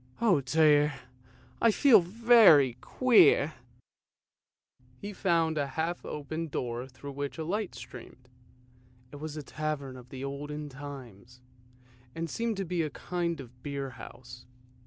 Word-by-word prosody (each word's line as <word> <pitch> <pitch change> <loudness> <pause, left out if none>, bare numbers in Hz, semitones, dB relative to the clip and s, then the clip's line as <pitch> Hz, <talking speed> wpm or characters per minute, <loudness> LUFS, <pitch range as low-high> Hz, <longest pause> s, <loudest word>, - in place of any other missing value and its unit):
O 195 -11 +3
dear, 150 0 +3 0.7
I 230 - +5
feel 225 -1 +6
very 190 - +6
queer! 170 - +4 0.7
" 125 -1 -36
He 205 +1 -5
found 165 -4 +1
a 140 - -1
half 165 +2 -2
open 160 +3 -5
door 125 -3 -4
through 140 +2 -10
which 140 0 -5
the 160 - -5
light 205 +3 -3
streamed. 125 +1 -12 0.8
It 145 - -9
was 155 +1 -7
a 150 - -5
tavern 145 -3 -4
of 125 0 -14
the 130 +1 -8
olden 145 +2 -5
times, 130 -4 -11 0.8
and 165 -1 -4
seemed 230 -2 -2
to 195 - -2
be 175 0 -1
a 155 - -1
kind 170 +2 -3
of 125 -1 -12
beer 140 -2 -4
house. 120 0 -12
150 Hz, 140 wpm, -29 LUFS, 135-170 Hz, 0.8 s, feel